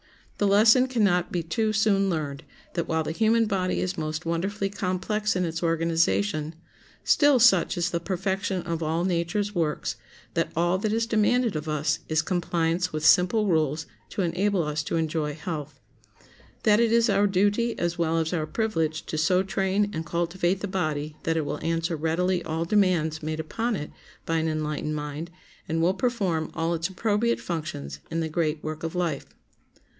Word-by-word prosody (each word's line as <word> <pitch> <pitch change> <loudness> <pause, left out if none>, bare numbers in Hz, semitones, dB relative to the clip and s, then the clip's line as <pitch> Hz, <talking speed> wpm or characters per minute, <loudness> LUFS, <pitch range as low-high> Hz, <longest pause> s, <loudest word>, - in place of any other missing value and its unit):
The 205 - +3
lesson 220 +6 +6
can 245 -4 0
not 180 -3 +2
be 175 -2 -1
too 215 +7 0
soon 200 -2 +2
learned 150 -3 -3 0.3
that, 170 - -2
while 160 0 0
the 155 - -3
human 225 +5 +3
body 190 -3 0
is 185 -1 -2
most 155 +1 -3
wonderfully 195 +4 -1
complex 205 +2 -1
in 180 -1 +1
its 165 0 -3
organization, 160 - +1 0.5
still 290 -2 +5
such 195 -9 +4
is 175 0 0
the 170 - 0
perfection 190 +1 -2
of 170 -1 -3
all 165 +2 0
nature's 190 +4 -1
works 165 -5 -1 0.4
that - - 0
all 175 +3 +2
that 210 +1 -1
is 225 +1 +1
demanded 230 0 +2
of 155 +1 -3
us 150 +1 0
is 155 0 +2
compliance 175 0 0
with 155 0 -3
simple 185 +5 +5
rules, 160 -4 +1 0.2
to 195 - -2
enable 180 +2 +1
us 150 0 -2
to 150 - -3
enjoy 155 -2 -1
health. 150 -3 -6 0.8
That 210 0 +5
it 235 -1 +3
is 230 0 +4
our 200 -1 +3
duty 205 +5 +1
as 175 0 -2
well 165 -1 +1
as 160 +1 0
our 155 -3 -1
privilege 165 -9 -1
to 155 - -3
so 180 +3 +3
train 195 +1 0
and 160 - -3
cultivate 175 +2 -1
the 205 - -2
body 155 -5 -2
that 165 0 0
it 155 - 0
will - - -4
answer 165 0 0
readily 170 +4 0
all 160 +1 -2
demands 170 -5 +2
made 155 0 -3
upon 225 +9 -2
it 150 -5 -5 0.3
by 165 - 0
an 160 0 0
enlightened 155 -1 -2
mind, 150 +2 -5 0.4
and 165 +1 0
will 170 +3 +3
perform 190 -8 -1
all 165 +1 0
its 165 0 -1
appropriate 215 +4 0
functions 70 - -5
in 165 0 -1
the 160 - -2
great 155 -1 -1
work 155 0 -5
of 165 +1 -4
life. 170 -6 -1
170 Hz, 180 wpm, -26 LUFS, 160-200 Hz, 0.8 s, lesson